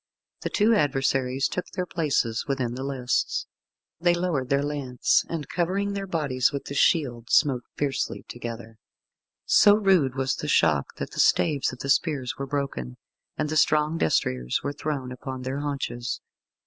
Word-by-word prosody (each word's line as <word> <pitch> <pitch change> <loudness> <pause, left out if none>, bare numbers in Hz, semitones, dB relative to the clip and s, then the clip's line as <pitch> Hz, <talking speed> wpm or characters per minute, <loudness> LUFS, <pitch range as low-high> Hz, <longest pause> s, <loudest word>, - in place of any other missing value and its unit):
The - - -2
two 220 +2 +3
adversaries 135 - +1
took 180 - -4
their 180 - -3
places 145 -10 0
within 130 -4 -1
the 130 +2 -5
lists. 130 -3 -1 0.5
They 175 0 +3
lowered 170 -8 -1
their 140 0 +2
lance, 140 -4 +1
and 160 -3 -4
covering 195 +3 -1
their 200 -1 -4
bodies 140 -8 +1
with 140 -1 -5
the - - -6
shield, 125 -6 +1
smote 130 -4 +3
fiercely 140 -2 -2
together. 115 -2 -7 0.7
So 205 0 +6
rude 185 - +3
was 135 -1 0
the 150 - -4
shock 80 - +2
that - - -5
the - - -7
staves 145 -4 +3
of 130 - -9
the 140 - -4
spears 140 -3 +1
were 140 - -5
broken, 135 - -3 0.4
and - - 0
the 155 - -3
strong 155 +2 +3
destriers 65 -5 0
were 140 - -2
thrown 145 -3 -4
upon 130 0 -6
their 130 +2 -3
haunches. 135 -5 -3
140 Hz, 160 wpm, -26 LUFS, 125-155 Hz, 0.7 s, So